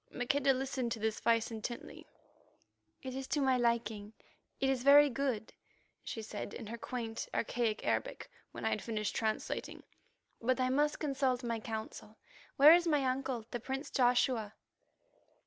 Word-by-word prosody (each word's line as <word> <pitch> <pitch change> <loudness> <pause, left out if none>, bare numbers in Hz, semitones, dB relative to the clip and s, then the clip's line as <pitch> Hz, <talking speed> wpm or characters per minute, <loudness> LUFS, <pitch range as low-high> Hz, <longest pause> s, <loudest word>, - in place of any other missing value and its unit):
Maqueda 270 +3 +1
listened 260 -2 -2
to 230 - -7
this 220 0 -1
advice 230 0 +2
intently. 225 +2 -7 1.0
"It 260 -1 -5
is 265 0 -5
to 295 - 0
my 265 -2 +3
liking; 225 -3 -1 0.5
it 270 - +1
is 265 -2 +1
very 285 +2 +7
good," 250 -4 -2 0.5
she 225 - -5
said 210 -1 -6
in - - -7
her 230 +3 -6
quaint 230 -3 -4
archaic 230 -2 -1
Arabic - - -1 0.2
when - - -7
I - - +2
had - - -1
finished 215 -2 -3
translating. 220 -1 -3 0.6
"But 255 +3 +1
I 255 0 +2
must 295 +3 +2
consult 270 -4 0
my 230 -1 -2
Council. 220 -1 -7 0.4
Where 295 +3 +9
is 345 0 +4
my 295 -4 +2
uncle, 255 -3 -2
the 240 - -3
prince 270 +4 -5
Joshua?" 245 -4 +2
245 Hz, 155 wpm, -33 LUFS, 225-270 Hz, 1.0 s, Where